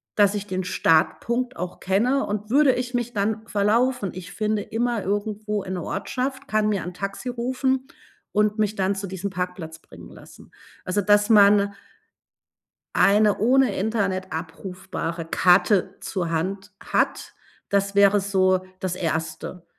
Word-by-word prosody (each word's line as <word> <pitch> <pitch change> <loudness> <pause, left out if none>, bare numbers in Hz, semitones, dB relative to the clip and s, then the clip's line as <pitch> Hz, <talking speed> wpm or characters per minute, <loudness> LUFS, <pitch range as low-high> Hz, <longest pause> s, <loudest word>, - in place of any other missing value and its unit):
dass 205 -1 +4
ich 205 0 -3
den 185 -1 -2
Startpunkt 235 +10 +1
auch 180 0 -5
kenne. 235 +9 +1
Und 210 +1 -4
würde 275 0 +5
ich 250 0 -3
mich 240 0 -2
dann 215 +2 -1
verlaufen, 210 +1 +1
ich 185 +1 -9
finde 215 -1 -1
immer 235 -1 -1
irgendwo 210 +1 -2
in 185 - -5
'ne 175 -3 -4
Ortschaft, 260 +6 -3
kann 215 0 +2
mir 200 -4 -1
'n 180 +1 -6
Taxi 200 +7 -5
rufen 260 +2 -1 0.5
und 210 +1 +1
mich 210 0 +1
dann 195 +1 0
zu 195 0 -5
diesem 190 +2 -4
Parkplatz 180 -3 -5
bringen - - -14
lassen. - - -15 0.3
Also, 185 +3 0
dass 205 +2 +3
man 200 -1 +5 1.2
eine 210 +1 +4
ohne 250 -1 +3
Internet 195 -3 -1
abrufbare 165 0 -5
Karte 185 +3 +3
zur 175 -5 -3
Hand 190 +5 -3
hat, - - -1 0.4
das 200 0 0
wäre 200 0 +5
so 185 -1 +2 0.2
das 185 -1 -3
1. 160 +1 -4
200 Hz, 145 wpm, -24 LUFS, 185-220 Hz, 1.2 s, würde